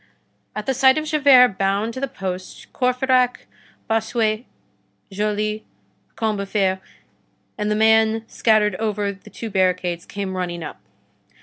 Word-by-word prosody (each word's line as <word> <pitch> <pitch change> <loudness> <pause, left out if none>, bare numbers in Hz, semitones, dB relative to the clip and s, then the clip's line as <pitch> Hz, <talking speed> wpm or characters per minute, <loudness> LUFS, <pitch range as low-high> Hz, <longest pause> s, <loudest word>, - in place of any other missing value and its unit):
At 210 0 -4
the 265 - +1
sight 265 +1 +4
of 310 - -1
Javert 275 -8 +5
bound 200 +4 0
to 260 - -6
the 275 - -1
post, 185 -5 -7
Courfeyrac, 255 0 +1 0.4
Bossuet, 220 0 0 0.7
Joly, 210 +1 -1 0.5
Combeferre, 200 -3 0 0.8
and 210 -1 -2
the 210 - +1
men 220 0 +3
scattered 215 -3 +2
over 210 -2 -1
the 195 - -16
two 225 -2 -7
barricades 180 -2 0
came 195 -2 -4
running 175 -2 -3
up. - - -8
215 Hz, 125 wpm, -21 LUFS, 195-235 Hz, 0.8 s, Javert